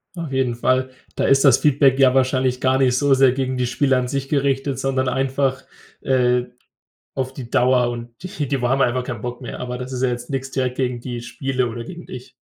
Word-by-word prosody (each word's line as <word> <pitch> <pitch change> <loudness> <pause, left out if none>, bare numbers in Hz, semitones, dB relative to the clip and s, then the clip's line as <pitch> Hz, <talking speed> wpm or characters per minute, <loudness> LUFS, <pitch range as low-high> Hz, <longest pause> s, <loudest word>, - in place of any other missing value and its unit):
Auf 165 -5 -5
jeden 130 -3 0
Fall, 130 +2 +1 0.3
da - - -1
ist 135 +1 +4
das 135 -2 +6
Feedback 140 -2 +3
ja 130 -2 +5
wahrscheinlich 130 -1 +1
gar 130 0 +2
nicht 125 -2 +2
so 140 +1 +3
sehr 135 -1 +5
gegen 130 0 -2
die 125 -1 0
Spieler 130 +2 +1
an 125 -1 -1
sich 135 0 -3
gerichtet, 135 -2 0
sondern 130 -1 -1
einfach, 135 0 0 0.4
äh, 125 -2 +2 0.7
auf 130 0 -3
die 125 -3 -8
Dauer 125 -1 +3
und 120 0 -7
die 170 -6 -4
die 135 -1 -1
wa 120 - +1
haben 135 +1 +2
einfach 125 0 +1
keinen 120 -4 -6
Bock 120 0 -6
mehr, - - -7
aber 125 0 -4
das 130 +1 -7
ist 125 0 -4
ja 130 - +3
jetzt 120 +1 -5
nix 135 0 -4
direkt 130 -1 -2
gegen 125 -2 -1
die 120 -2 -5
Spiele 130 0 -2
oder 115 0 -6
gegen 175 +6 -10
dich. 125 0 -10
130 Hz, 225 wpm, -21 LUFS, 125-135 Hz, 0.7 s, das